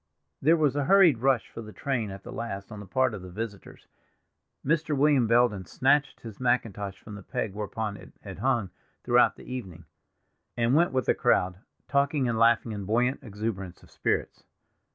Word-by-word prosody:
There 160 +4 +4
was 150 -4 +2
a 145 -1 0
hurried 175 -8 +5
rush 130 -4 +2
for 115 - -7
the 110 -1 -10
train 115 +1 -2
at 95 0 -9
the - - -9
last 100 -3 -6
on 105 - -8
the 105 - -10
part 130 +4 +1
of 100 - -6
the 90 - -9
visitors. 105 +1 -7 0.8
Mr. 155 0 +1
William 140 -4 +4
Belden 115 -5 +2
snatched 140 +5 +1
his 110 -4 -10
mackintosh 110 -6 -1
from 105 - -11
the 105 - -8
peg 100 +1 -4
whereon 105 0 -4
it - - -14
had - - -9
hung 115 -5 0 0.3
throughout - - +4
the - - -14
evening, 95 -10 -7 0.7
and 120 +1 +2
went 170 +4 +4
with 130 -1 0
the - - +3
crowd, 90 0 +1 0.3
talking 140 -1 +1
and 115 -2 -1
laughing 115 0 +3
in 105 -2 -5
buoyant 120 +6 +1
exuberance 105 -6 -5
of - - -19
spirits. - - -2
115 Hz, 185 wpm, -27 LUFS, 100-135 Hz, 0.8 s, hurried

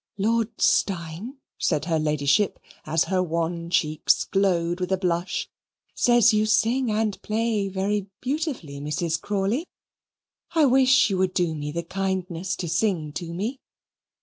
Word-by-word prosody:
"Lord 225 +2 0
Steyne," 185 - 0 0.2
said 155 -3 0
her 165 -2 +1
Ladyship, 150 +5 +1 0.3
as 160 +2 +2
her 190 -1 0
wan 170 0 -2
cheeks 155 -3 +2
glowed 175 -3 +1
with 180 +1 -3
a 190 - +3
blush, 180 -1 -1 0.5
"says 240 -1 +4
you 215 0 +2
sing 235 +4 +2
and 215 -1 -1
play 215 -2 0
very 195 +1 -1
beautifully, 260 - -3
Mrs. 160 +3 -2
Crawley 205 - -1 0.9
I 315 -2 +5
wish 260 -3 +5
you 190 - 0
would 185 -1 0
do 175 -3 +1
me 150 -1 -4
the 170 +2 -3
kindness 190 -1 -2
to 175 - -4
sing 165 -3 0
to 170 +1 -5
me." 215 +10 -3
190 Hz, 145 wpm, -25 LUFS, 170-215 Hz, 0.9 s, I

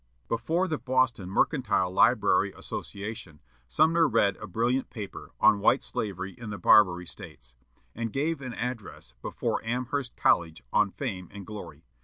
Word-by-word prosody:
Before 160 +11 0
the 155 -3 -2
Boston 130 -7 +1
Mercantile 105 - +1
Library 95 - +3
Association, 100 -6 -7 0.3
Sumner 160 - +4
read 100 -8 +2
a - - -8
brilliant 120 +7 0
paper 105 -5 -8
on 110 -3 +5
"White - - +3
Slavery 95 -2 -4
in 115 -3 -9
the 105 - -5
Barbary 90 -4 +5
States," 75 - -12 0.4
and 115 -1 -4
gave 150 +3 -1
an 125 -3 -6
address 115 - -5
before - - -2
Amherst 125 +3 -2
College 80 -1 +2
on 105 -1 +4
"Fame 95 -7 -5
and 100 -2 -9
Glory." 85 -8 -9
110 Hz, 145 wpm, -28 LUFS, 95-130 Hz, 0.4 s, on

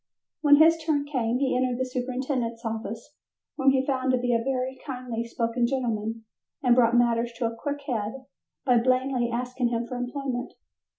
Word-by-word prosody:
When 290 -1 +7
his 325 +2 +5
turn 300 -3 +1
came 250 -5 0
he 265 -1 +1
entered 250 -1 +1
the 260 - 0
superintendent's 250 -2 -3
office, 225 +3 -5 0.4
whom 270 -2 +3
he 265 0 +2
found 260 -1 0
to 255 - +3
be 245 0 0
a 230 0 +1
very 260 0 -2
kindly 250 -4 -4
spoken 235 +1 0
gentleman, 225 -3 -2 0.4
and 250 -2 +5
brought 240 -1 +4
matters 235 0 +2
to 245 - -2
a 230 0 -2
quick 285 +4 -4
head 245 0 -3 0.4
by 250 -3 +5
blandly 255 0 +1
asking 250 +1 -1
him 235 0 -1
for 250 +1 -5
employment. 245 0 -3
250 Hz, 175 wpm, -26 LUFS, 235-265 Hz, 0.4 s, When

